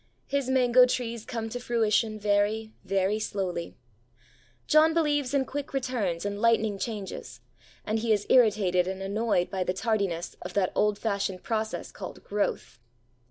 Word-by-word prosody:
His 280 -2 -1
mango 250 -1 +5
trees 235 -3 -3
come 225 -2 -4
to 245 +2 -5
fruition 225 -2 +1
very, 210 +2 +1
very 195 +2 +1
slowly. 185 -5 -3 0.9
John 315 +1 +5
believes 290 -5 +1
in 275 -2 +1
quick 285 +1 -5
returns 225 -10 -1
and 205 0 -3
lightning 220 -3 +2
changes; 205 -3 -5 0.5
and 215 +1 0
he 225 0 0
is 205 -2 +2
irritated 200 -7 +4
and 190 0 -4
annoyed 205 -2 0
by 190 -1 -1
the 180 - -1
tardiness 200 -5 -1
of - - -7
that 195 -3 +2
old 210 -1 +2
fashioned 200 -4 -2
process 220 -1 -3
called - - -9
growth. 200 -10 -2
215 Hz, 150 wpm, -27 LUFS, 200-240 Hz, 0.9 s, mango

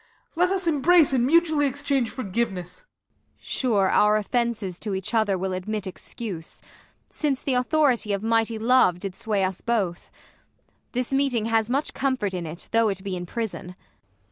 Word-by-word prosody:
Let 360 +2 +3
us 380 -1 0
embrace 320 0 +4
and 250 -1 +2
mutually 315 -2 +3
exchange 275 -3 -1
Forgiveness! 195 -6 -3
Ang. - - -26 0.5
Sure, 210 -7 +1
our 210 0 +4
offences 215 -4 -2
to 205 -3 -3
each 190 +4 -3
other 215 -4 +2
will 190 +1 -2
Admit 205 +3 -3
excuse, 185 -2 -6 0.5
since 285 -4 -1
the 270 - 0
authority 250 -3 +2
of 200 +1 -1
mighty 225 0 +1
love 225 -6 +3
Did 195 -1 -5
sway 205 -2 -1
us 185 -1 -2
both. 200 -7 -1 0.8
This 250 +1 -1
meeting 270 -5 +1
has 225 0 +1
much 275 +4 -1
com 265 -1 0
fort 205 -5 -2
In 175 -3 -4
it 165 +3 -7
though 230 -1 +3
it 195 -1 -4
be 195 -2 -3
in 175 -1 -6
prison. 205 -4 -5
225 Hz, 170 wpm, -25 LUFS, 195-265 Hz, 0.8 s, embrace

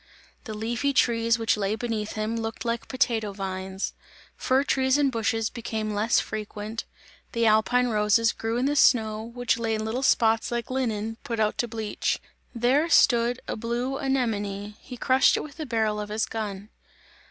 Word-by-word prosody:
The 220 - -5
leafy 235 +6 -1
trees 230 -2 +3
which 225 -1 +2
lay 205 +1 0
beneath 220 -2 -3
him, 215 +1 -2
looked 225 0 -4
like 235 0 -2
potato 230 -6 0
vines; 190 0 -4 0.4
fir 260 +2 +2
trees 265 -1 +2
and 285 -2 +2
bushes 225 -1 0
became 220 -3 -3
less 215 +3 +2
frequent; 215 +1 -5 0.5
the 230 0 +1
alpine 225 +3 +3
roses 215 +1 +3
grew 225 +1 -2
in 250 - +1
the 290 +1 +1
snow, 220 -6 +4
which 235 +1 -1
lay 225 -1 0
in 215 0 -3
little 230 +4 -2
spots 225 -2 +3
like 235 +1 -3
linen 225 -4 -2
put 230 -2 -3
out 215 -1 +2
to 240 - +1
bleach. 220 -2 -2 0.4
There 260 +8 +2
stood 240 -4 +4
a - - -2
blue 240 +4 -2
anemone, 210 -6 -1
he 250 - -9
crushed 260 +2 +4
it - - -3
with 295 -2 -11
the 310 -3 -5
barrel 220 -3 0
of 210 0 -5
his 215 +1 0
gun. 210 -2 -5
225 Hz, 175 wpm, -26 LUFS, 215-245 Hz, 0.5 s, snow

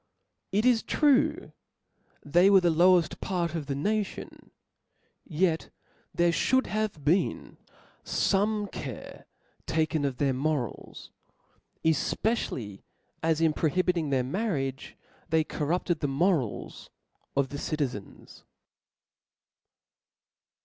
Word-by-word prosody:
It 210 +4 +1
is 245 -3 +4
true, 300 +4 +2 0.7
they 175 +6 +5
were 195 -2 +6
the 175 -1 +3
lowed 175 0 +3
part 175 -3 -1
of 160 -4 -4
the 140 - -2
nation, 205 +8 -3 0.8
yet 165 -1 0 0.4
there 170 0 +2
fliould 260 +9 +2
have 215 -9 -3
been 170 +6 0 0.4
fo'me 205 +1 0
care 130 -6 -8 0.4
taken 155 -1 0
of 135 -3 -1
their 135 -1 +1
morals; 135 -3 -3 0.7
efpjccially, 145 - -1 0.4
as 160 0 +1
in 160 -2 +3
prohibithig 170 0 0
their 130 -2 +1
marriage, 135 - -3 0.3
they 160 -1 +3
corrupted 165 +2 -1
the 145 - -1
morals 140 - -1 0.5
of 140 -1 +2
the 145 - -6
citizens. 140 -11 -5
165 Hz, 100 wpm, -28 LUFS, 145-195 Hz, 0.8 s, were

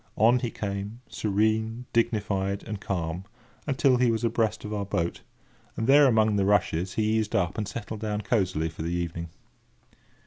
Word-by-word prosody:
On 120 +4 +5
he 120 - -2
came, 100 +2 -5
serene, 110 +3 0
dignified, 105 -4 0
and 105 -2 -6
calm, 85 -2 -3 0.4
until 135 -2 +3
he 125 -1 +3
was 115 0 0
abreast 115 -2 0
of 105 - -4
our 105 -1 -1
boat, 85 -4 -2 0.6
and 110 - -1
there, 140 +3 +7
among 110 -3 +3
the 100 - +2
rushes, 95 -3 +1
he 110 0 +2
eased 110 -1 -2
up, 90 -2 +1
and 105 -2 -2
settled 110 0 -6
down 105 -1 -2
cosily 95 -7 0
for 80 - -9
the 85 +2 -2
evening. 85 -1 -3
105 Hz, 170 wpm, -27 LUFS, 95-115 Hz, 0.6 s, there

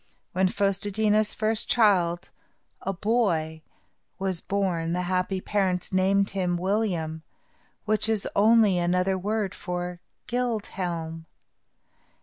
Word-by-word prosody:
When 185 +1 +2
Fos 195 0 0
te 205 - -1
dí 210 +1 +1
na's 215 0 +3
first 220 0 0
child, 185 -6 +2 0.5
a 195 - -2
boy, 175 -6 0 0.6
was 190 -3 -1
born, 180 -4 -1
the 180 +1 -1
happy 185 +1 -1
parents 190 -3 -1
named 195 +1 +2
him 180 -3 0
William, 180 -5 -1 0.6
which 215 0 +2
is 220 -3 0
only 210 -3 +5
another 180 +2 +1
word 205 +1 -2
for 180 0 -5 0.3
Gild 240 -3 -1
Helm. 165 -3 -5
190 Hz, 125 wpm, -26 LUFS, 175-210 Hz, 0.6 s, only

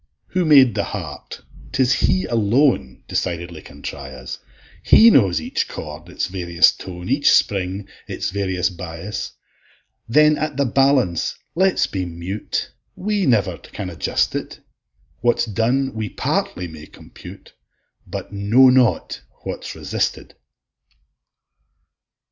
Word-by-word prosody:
Who 185 -1 0
made 135 -6 +6
the 100 0 -1
heart, 85 -9 -7 0.3
'tis 130 -1 +2
He 95 -6 +1
alone 115 - +1
Decidedly 85 -2 -3
can 70 0 -14
try 70 -2 -6
us; 65 -1 -8 0.4
He 230 +1 +7
knows 95 - +4
each 80 - -2
chord, 75 +3 -8
its 90 - -2
various 90 -2 +3
tone, 90 -1 -9
Each 140 +3 +3
spring, 95 0 +1 0.2
its - - -3
various 95 -2 -1
bias: 90 +3 -6 0.8
Then 150 +4 +5
at 150 -2 -3
the 140 - +2
balance 130 - +2 0.2
let's 190 +1 +2
be 95 -2 -3
mute, 90 +4 -4 0.2
We 205 -1 -1
never 110 -7 +2
can 90 -2 -7
adjust 85 - 0
it; - - -5 0.6
What's 120 0 +2
done 120 +5 0
we 110 -2 -4
partly 90 0 -2
may 80 -2 -11
compute, - - -13 0.5
But - - -7
know 110 +7 +5
not 125 -2 +2 0.2
what's - - -6
resisted. - - -3
100 Hz, 125 wpm, -21 LUFS, 85-130 Hz, 0.8 s, He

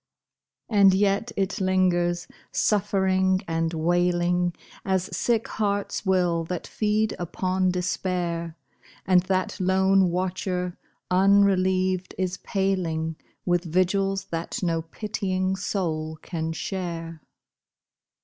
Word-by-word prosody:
And 200 -4 +5
yet 200 +3 +1
it 195 0 -1
lingers, 175 -2 +1 0.2
suffering 190 -2 +2
and 165 0 0
wailing, 175 +1 +1 0.3
As 190 -1 -1
sick 230 -2 +1
hearts 205 -1 -2
will 175 -3 +2
that 180 +1 -4
feed 215 0 0
upon 185 +2 0
despair, 175 -2 -2 0.5
And 185 -1 +5
that 185 0 -1
lone 190 0 +3
watcher, 180 0 -2 0.4
unrelieved, 185 -1 +3
is 185 -1 -1
paling 175 -5 -1 0.3
With 175 -1 +2
vigils 190 +3 +1
that 170 +6 -3
no 165 -2 +1
pitying 190 +1 -2
soul 160 -5 -2
can 160 -2 -3
share. 165 -2 -5
185 Hz, 100 wpm, -25 LUFS, 175-190 Hz, 0.5 s, And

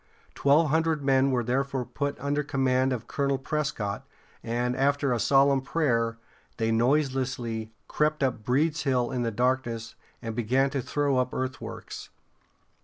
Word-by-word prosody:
Twelve 150 +3 +3
hundred 160 -2 +1
men 135 0 +3
were 125 -2 +1
therefore 130 +1 -1
put 140 +3 -3
under 145 +1 0
command 130 -2 +1
of 125 -4 -3
Colonel 140 -1 0
Pres´cott, 135 -7 -2 0.4
and, 120 +2 -1
after 140 0 +1
a 120 - -1
solemn 135 +2 +4
prayer, 115 -6 0 0.4
they 115 -1 0
noiselessly 125 -3 0 0.2
crept 150 -1 0
up 125 -4 -1
Breeds 150 +7 +1
Hill 125 -3 +1
in 125 -2 -1
the 120 - 0
darkness, 120 -1 -1 0.3
and 115 -1 -5
began 130 +4 +1
to 135 -1 -1
throw 145 +1 0
up 125 0 -1
earthworks. 130 0 -5
130 Hz, 145 wpm, -27 LUFS, 120-140 Hz, 0.4 s, solemn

